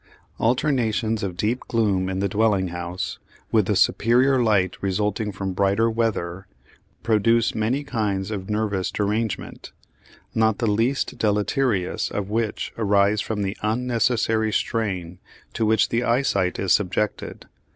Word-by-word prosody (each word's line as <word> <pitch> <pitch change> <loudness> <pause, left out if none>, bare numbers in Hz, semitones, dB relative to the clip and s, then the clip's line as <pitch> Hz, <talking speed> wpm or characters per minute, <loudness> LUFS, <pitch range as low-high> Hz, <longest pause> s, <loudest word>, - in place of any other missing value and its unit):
Alternations 115 -3 +1
of 95 -4 -4
deep 115 +6 0
gloom 100 -5 +1
in 95 - -3
the 100 - +1
dwelling 100 -2 +1
house 85 +1 -5 0.3
with 110 -4 +3
the 105 - +1
superior 125 +7 +3
light 100 -5 +2
resulting 105 +2 -1
from 95 -1 -4
brighter 100 +4 +2
weather 100 -5 -2 0.6
produce 115 +1 +2
many 115 +7 0
kinds 105 -7 -2
of 95 -2 -5
nervous 105 -3 -1
derangement, 105 +1 -3 0.6
not 110 -1 +2
the 120 - -1
least 115 +6 0
deleterious 105 -1 0
of 100 0 -4
which 110 -1 -2
arise 100 0 +3
from 105 -2 -3
the 95 +1 -2
unnecessary 115 -1 +1
strain 95 -6 -2 0.3
to 110 - 0
which 110 0 +3
the 115 +1 0
eyesight 115 -7 +1
is 95 - +2
subjected. 105 +1 -1
105 Hz, 130 wpm, -23 LUFS, 95-115 Hz, 0.6 s, with